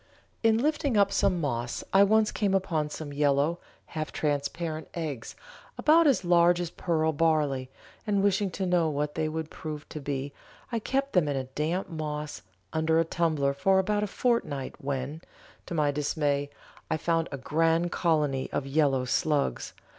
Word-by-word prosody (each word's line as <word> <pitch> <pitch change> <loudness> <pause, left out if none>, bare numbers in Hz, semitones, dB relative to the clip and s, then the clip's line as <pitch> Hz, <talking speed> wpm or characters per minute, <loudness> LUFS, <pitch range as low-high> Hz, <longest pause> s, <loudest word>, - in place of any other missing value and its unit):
In 225 -1 +4
lifting 285 -2 +1
up 200 -1 +4
some 185 -2 +2
moss 120 -6 -2
I 195 +1 +7
once 215 +1 +3
came 200 -2 +1
upon 165 -6 0
some 150 -1 -6
yellow, 145 +3 +2 0.3
half 155 -2 -5
transparent 155 +2 -2
eggs 150 -9 -5 0.4
about 320 +1 +5
as 250 -10 +2
large 175 0 +5
as 175 -1 -3
pearl 160 -2 0
barley, 150 -5 +1 0.4
and 200 -2 +2
wishing 200 0 +2
to 190 +1 -3
know 175 -3 +2
what 150 0 -2
they 155 0 -1
would 160 0 -4
prove 150 -2 -7
to 150 - -6
be 140 0 -3 0.4
I 230 - 0
kept 275 +5 -1
them 180 -5 +3
in 135 -2 -2
damp 165 +6 -1
moss 150 -2 -5 0.3
under 160 +1 +2
a 165 - +2
tumbler 155 -5 +1
for 190 +7 +2
about 205 +2 +1
a 210 - 0
fortnight, 195 - -1
when, 140 +3 -3 0.5
to 170 - -4
my 150 -2 +2
dismay, 145 -1 0 0.4
I - - +1
found 165 +1 0
a 140 - -4
grand 165 +5 +1
colony 150 -6 +1
of 135 - -2
yellow 135 -2 +2
slugs! 140 - 0
160 Hz, 165 wpm, -28 LUFS, 145-185 Hz, 0.5 s, I